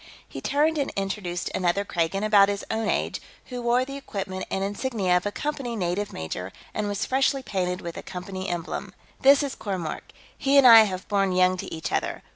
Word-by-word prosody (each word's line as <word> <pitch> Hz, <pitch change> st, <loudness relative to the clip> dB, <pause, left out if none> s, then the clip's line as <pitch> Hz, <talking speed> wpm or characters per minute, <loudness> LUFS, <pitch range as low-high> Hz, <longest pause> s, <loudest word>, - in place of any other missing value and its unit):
He -, -, -8 dB
turned 305 Hz, +2 st, +1 dB
and 280 Hz, -, 0 dB
introduced 195 Hz, -3 st, -3 dB
another 185 Hz, +2 st, +1 dB
Kragan, 175 Hz, +2 st, -1 dB
about 205 Hz, -2 st, +5 dB
his 200 Hz, 0 st, -3 dB
own 220 Hz, 0 st, -1 dB
age, -, -, -1 dB, 0.3 s
who 250 Hz, -1 st, -5 dB
wore 240 Hz, +2 st, +2 dB
the 275 Hz, +1 st, -7 dB
equipment 190 Hz, -8 st, -5 dB
and 195 Hz, -, -1 dB
insignia 205 Hz, -2 st, 0 dB
of 180 Hz, +3 st, +1 dB
a -, -, -2 dB
Company 270 Hz, -2 st, -3 dB
native 195 Hz, +1 st, -2 dB
major 85 Hz, +4 st, -5 dB, 0.2 s
and 210 Hz, -1 st, -2 dB
was 205 Hz, -1 st, -2 dB
freshly 270 Hz, +1 st, +1 dB
painted 180 Hz, -5 st, -2 dB
with 170 Hz, -1 st, -6 dB
the -, -, -7 dB
Company 185 Hz, +1 st, -6 dB
emblem. 175 Hz, -1 st, -4 dB, 0.2 s
"This 280 Hz, +2 st, +6 dB
is 275 Hz, -2 st, -3 dB
Kormork. 185 Hz, -6 st, -5 dB, 0.2 s
He 275 Hz, +1 st, +2 dB
and 275 Hz, -, +7 dB
I 225 Hz, -2 st, +10 dB
have 185 Hz, -2 st, -5 dB
borne 195 Hz, -2 st, +1 dB
young 185 Hz, 0 st, +4 dB
to -, -, -6 dB
each 160 Hz, -, -4 dB
other. -, -, -2 dB
200 Hz, 200 wpm, -25 LUFS, 185-245 Hz, 0.3 s, I